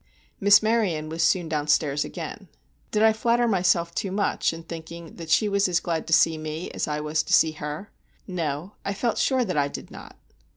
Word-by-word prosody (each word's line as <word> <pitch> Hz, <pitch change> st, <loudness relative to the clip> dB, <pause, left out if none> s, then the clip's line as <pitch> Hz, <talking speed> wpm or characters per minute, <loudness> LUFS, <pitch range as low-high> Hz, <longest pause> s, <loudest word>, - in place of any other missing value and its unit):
Miss 205 Hz, +1 st, +6 dB
Maryon 200 Hz, -9 st, 0 dB
was 165 Hz, +1 st, -3 dB
soon 170 Hz, +1 st, +2 dB
down 150 Hz, -2 st, -2 dB
stairs 150 Hz, -1 st, +2 dB
again. -, -, -7 dB, 0.4 s
Did 215 Hz, 0 st, +1 dB
I 220 Hz, 0 st, +6 dB
flatter 235 Hz, +2 st, +1 dB
myself 175 Hz, -4 st, +2 dB
too 195 Hz, +1 st, -3 dB
much 200 Hz, +1 st, 0 dB
in 165 Hz, 0 st, -8 dB
thinking 165 Hz, 0 st, -9 dB
that 165 Hz, -1 st, -8 dB
she 210 Hz, +7 st, +3 dB
was 200 Hz, -1 st, +2 dB
as 175 Hz, -1 st, +2 dB
glad 165 Hz, -2 st, -3 dB
to -, -, -6 dB
see 160 Hz, -1 st, +4 dB
me 155 Hz, +2 st, -5 dB
as -, -, -3 dB
I 150 Hz, 0 st, -2 dB
was 150 Hz, +1 st, 0 dB
to 155 Hz, -, -3 dB
see 160 Hz, -, +5 dB
her? 150 Hz, +5 st, -7 dB, 0.3 s
No—I 180 Hz, +3 st, -4 dB
felt 235 Hz, +2 st, -1 dB
sure 260 Hz, -2 st, +2 dB
that 180 Hz, -6 st, -3 dB
I 140 Hz, -1 st, +2 dB
did -, -, -8 dB
not. -, -, -12 dB
170 Hz, 205 wpm, -25 LUFS, 155-200 Hz, 0.4 s, Miss